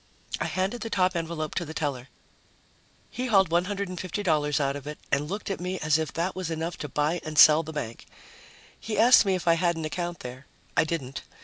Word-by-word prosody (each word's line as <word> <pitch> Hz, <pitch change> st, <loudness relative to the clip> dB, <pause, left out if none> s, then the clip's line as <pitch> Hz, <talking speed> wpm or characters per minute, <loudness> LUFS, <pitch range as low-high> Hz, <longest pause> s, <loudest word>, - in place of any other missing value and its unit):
I -, -, -1 dB
handed 190 Hz, +6 st, -2 dB
the 225 Hz, -, -4 dB
top 185 Hz, -3 st, +1 dB
envelope 165 Hz, -2 st, -3 dB
to 175 Hz, -, -1 dB
the 160 Hz, -1 st, -8 dB
teller. 140 Hz, -4 st, -2 dB, 1.0 s
He 255 Hz, +2 st, -3 dB
hauled 195 Hz, -7 st, +4 dB
$150 180 Hz, -4 st, 0 dB
out 140 Hz, -1 st, 0 dB
of 145 Hz, 0 st, -8 dB
it 150 Hz, -, -6 dB
and 145 Hz, +2 st, 0 dB
looked 205 Hz, +1 st, -4 dB
at 195 Hz, -, -3 dB
me 180 Hz, +1 st, -3 dB
as 155 Hz, -1 st, +2 dB
if 160 Hz, -, -2 dB
that 175 Hz, +3 st, -2 dB
was 185 Hz, -3 st, -3 dB
enough 165 Hz, +1 st, -3 dB
to 150 Hz, -, -6 dB
buy 150 Hz, +5 st, 0 dB
and 155 Hz, -1 st, -6 dB
sell 155 Hz, +1 st, +9 dB
the 160 Hz, 0 st, -7 dB
bank. 120 Hz, -7 st, -6 dB, 0.7 s
He 215 Hz, -, -4 dB
asked 235 Hz, 0 st, +7 dB
me 190 Hz, -, +3 dB
if 180 Hz, -, -5 dB
I 170 Hz, -, +7 dB
had 170 Hz, 0 st, +1 dB
an 160 Hz, -, -3 dB
account 175 Hz, +2 st, -4 dB
there. 125 Hz, +2 st, -9 dB, 0.3 s
I 165 Hz, -, +4 dB
didn't. 140 Hz, -5 st, -4 dB
165 Hz, 210 wpm, -27 LUFS, 150-185 Hz, 1.0 s, sell